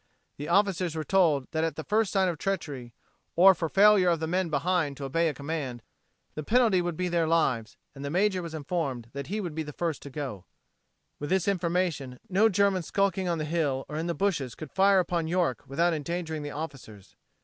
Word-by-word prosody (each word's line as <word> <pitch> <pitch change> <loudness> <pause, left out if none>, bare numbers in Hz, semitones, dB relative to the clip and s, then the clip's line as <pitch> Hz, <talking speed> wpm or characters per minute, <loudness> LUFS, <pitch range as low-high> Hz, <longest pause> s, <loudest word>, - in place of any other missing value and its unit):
The 145 - -6
officers 185 -3 +2
were 160 - -2
told 155 -6 +3
that 160 0 0
at 165 - -1
the 160 - -5
first 215 +1 +1
sign 190 -2 +2
of 170 -4 -2
treachery, 145 -11 -4 0.4
or 190 +3 +8
for 165 -2 -2
a - - -11
failure 200 -1 +5
of 170 -2 +1
the 160 - -2
men 180 +2 0
behind 155 -1 0
to 145 - -7
obey 165 +5 +1
a - - -3
command, 140 -5 -4 0.5
the 155 - -4
penalty 220 - +3
would 175 -2 -3
be 180 - -1
their 170 -2 +1
lives; 130 -9 +1 0.2
and 140 - -9
the 140 - -3
major 185 +3 +1
was 165 -2 -6
informed 140 -7 -3
that 140 0 -5
he 210 +4 -2
would 175 -6 -4
be 160 - -3
the 150 -1 -6
first 165 -3 -2
to 140 - -9
go. 130 - -6 0.7
With 145 - -4
this 190 -2 +2
formation 170 -8 -1
no 205 +4 +4
German 200 -1 +2
skulking 195 +1 0
on 170 - 0
the 155 - -2
hill 150 -4 -1
or 150 - -5
in 165 +2 -2
the 170 - -1
bushes 165 - -1
could 155 -3 -9
fire 195 0 +4
upon 175 -3 0
York 170 -8 0
without 170 +5 +1
endangering 160 0 -3
the 145 - -5
officers. 135 -10 -8
165 Hz, 215 wpm, -28 LUFS, 145-185 Hz, 0.7 s, or